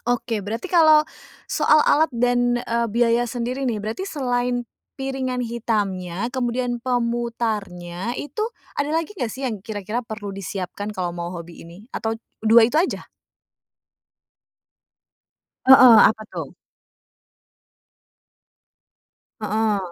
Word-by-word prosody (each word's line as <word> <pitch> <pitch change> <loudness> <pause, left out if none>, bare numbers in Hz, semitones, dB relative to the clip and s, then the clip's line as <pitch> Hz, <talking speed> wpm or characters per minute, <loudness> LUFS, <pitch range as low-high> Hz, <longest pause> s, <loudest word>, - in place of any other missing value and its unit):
oke, 230 -3 -1
berarti 225 - -4
kalau 315 -3 +6 0.5
soal 305 - +4
alat 315 +1 +4
dan, 245 0 +2
eee, 235 0 -1
biaya 235 0 +3
sendiri 245 +3 -3
nih, 230 -4 -1
berarti 215 - -4
selain 245 -7 -1 0.3
piringan 265 -2 -2
hitamnya, 210 -4 -2
kemudian 245 -1 -1
pemutarnya, 230 -6 -2
itu 425 +9 -3 0.3
ada 290 +1 -1
lagi 330 +5 -1
nggak 245 -10 -2
sih, 265 0 -4
yang 220 - -3
kira-kira 215 +3 -4
perlu 215 -2 -7
disiapkan 195 +2 -5
kalau 180 -3 -3
mau 175 +1 -4
hobi 170 -1 -9
ini 175 +7 -14
atau 225 0 -2
t 225 - -7 0.2
2 225 +1 +7
itu 300 - -2
aja? 350 +4 0 2.6
Heeh, 255 -2 +9
apa 220 0 -3
tuh? - - -5 2.9
Heeh. 215 0 0
235 Hz, 115 wpm, -22 LUFS, 210-250 Hz, 2.9 s, Heeh